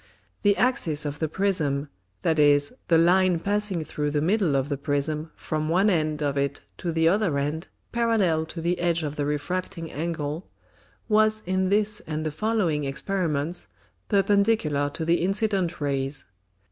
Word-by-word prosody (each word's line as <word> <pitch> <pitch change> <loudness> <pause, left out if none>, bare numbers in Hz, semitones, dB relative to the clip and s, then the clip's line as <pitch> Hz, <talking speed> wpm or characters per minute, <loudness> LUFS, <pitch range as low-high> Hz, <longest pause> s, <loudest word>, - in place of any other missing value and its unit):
The 205 -1 +3
Axis 175 - +1
of 145 0 -4
the 160 - 0
Prism 155 -6 0 0.4
(that 160 -1 +2
is, 145 -1 +4
the 165 - +5
Line 180 +2 +4
passing 200 -2 0
through 150 0 -2
the 145 0 0
middle 175 -1 +2
of 135 0 +1
the 145 - -1
Prism 150 +2 -1
from 155 0 -3
one 190 +5 +3
end 155 -3 0
of 140 -1 0
it 140 0 -1 0.2
to 175 - -3
the 160 0 +2
other 185 -4 +2
end 150 +4 -2 0.2
parallel 205 -9 +1
to 165 - -6
the 175 +2 0
edge 170 -1 +1
of 150 -1 -3
the 145 -1 -1
Refracting 165 +2 -3
Angle) 155 +1 -4 0.6
was 215 0 +3
in 185 +1 0
this 210 +1 +1
and 155 0 -3
the 155 - -1
following 185 -5 0
Experiments 155 - -1 0.4
perpendicular 200 -7 +2
to 160 +3 -4
the 170 +1 +2
incident 195 -2 0
Rays. 135 -1 -1
165 Hz, 160 wpm, -25 LUFS, 150-195 Hz, 0.6 s, the